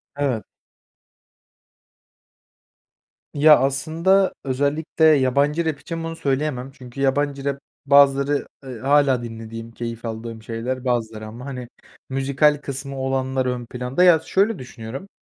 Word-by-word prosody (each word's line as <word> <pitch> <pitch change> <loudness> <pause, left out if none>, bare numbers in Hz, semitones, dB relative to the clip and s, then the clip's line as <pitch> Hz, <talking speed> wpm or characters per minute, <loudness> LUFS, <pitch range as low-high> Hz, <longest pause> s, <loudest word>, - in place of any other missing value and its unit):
Evet. 130 -7 -1 2.9
Ya, 150 +1 +7
aslında 165 +8 +2
özellikle 145 +4 -1
yabancı 145 +2 +3
rap 150 -3 -1
için 165 +1 -6
bunu 165 0 -4
söyleyemem 135 -2 -2
çünkü 135 -1 -10
yabancı 140 0 0
rap, 140 -1 -1 0.3
bazıları, 140 0 +4 0.2
ııı, 125 -4 -8
hâlâ 135 -3 +3
dinlediğim, 115 0 -8
keyif 115 0 -6
aldığım 110 0 -6
şeyler 125 +3 -4
bazıları 110 -3 -1
ama, 120 +4 -9
hani, 125 -3 -6 0.4
müzikal 140 +3 +2
kısmı 140 -1 -6
olanlar 130 0 -1
ön 125 -1 -2
planda. 125 +7 -1
Ya, 175 -3 +7
şöyle 195 +3 +1
düşünüyorum, 125 - -8
135 Hz, 120 wpm, -22 LUFS, 125-145 Hz, 2.9 s, Ya